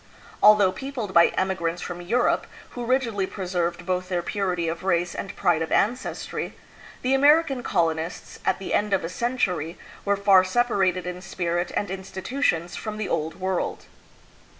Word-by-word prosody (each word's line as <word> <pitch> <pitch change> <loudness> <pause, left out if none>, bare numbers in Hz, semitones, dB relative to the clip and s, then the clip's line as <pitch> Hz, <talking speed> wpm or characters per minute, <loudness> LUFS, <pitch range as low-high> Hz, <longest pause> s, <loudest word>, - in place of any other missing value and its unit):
Although 210 -2 +7
peopled 250 -5 -5
by 170 -1 +7
emigrants 180 -3 -1
from 175 0 -6
Europe, 235 +8 +1 0.2
who 240 -1 -5
rigidly 230 -7 +1
preserved 175 -2 -2
both 185 0 -1
their 175 -2 -1
purity 180 -3 -1
of 165 +2 -3
race 175 -2 +1
and 195 - -6
pride 165 -2 +2
of 165 - -3
ancestry, 240 +5 -1 0.5
the 255 +1 +2
Amer 295 +4 +6
ican 270 -6 -5
colonists, 165 0 -1
at - - +1
the 195 - -5
end 210 -1 +1
of 195 - +2
a 165 - -3
century, 180 -8 -1 0.3
were 200 0 +1
far 195 -2 +6
separated 185 -4 +1
in 180 0 -5
spirit 175 -2 -2
and 205 - -1
institutions 190 -1 -2
from 215 -1 -5
the 215 - -2
Old 160 +4 -2
World. 185 -1 -2
190 Hz, 160 wpm, -25 LUFS, 175-215 Hz, 0.5 s, Although